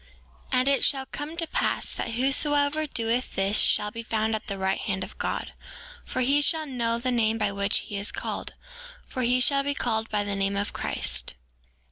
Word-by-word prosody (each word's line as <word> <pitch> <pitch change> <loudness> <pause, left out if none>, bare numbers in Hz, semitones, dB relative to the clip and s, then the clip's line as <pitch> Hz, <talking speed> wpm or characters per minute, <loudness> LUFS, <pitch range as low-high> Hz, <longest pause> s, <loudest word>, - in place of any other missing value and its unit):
5:9 - - +3
And 255 +1 +2
it 280 0 +3
shall 270 -2 +2
come 295 +4 -6
to 335 - 0
pass - - -1
that 230 - -3
whosoever 285 +4 +2
doeth 235 -1 -1
this 195 +2 +3
shall 210 - +2
be 230 - -6
found 220 -1 0
at 220 0 -3
the 200 - -3
right 190 0 0
hand 190 -2 -2
of - - -10
God, - - -2 0.5
for 255 - -2
he 280 +4 +4
shall 315 +2 +2
know 235 -4 -1
the 255 +2 -1
name 225 -2 +2
by 210 -2 +1
which 200 +1 +1
he 205 - -6
is 200 +1 -1
called; - - -4 0.5
for 255 - -4
he 250 +1 +3
shall 275 +2 +3
be 285 +1 -1
called 225 -3 -1
by 210 -1 0
the 205 0 -2
name 195 0 0
of 205 - -1
Christ. - - -1
235 Hz, 205 wpm, -27 LUFS, 210-275 Hz, 0.5 s, he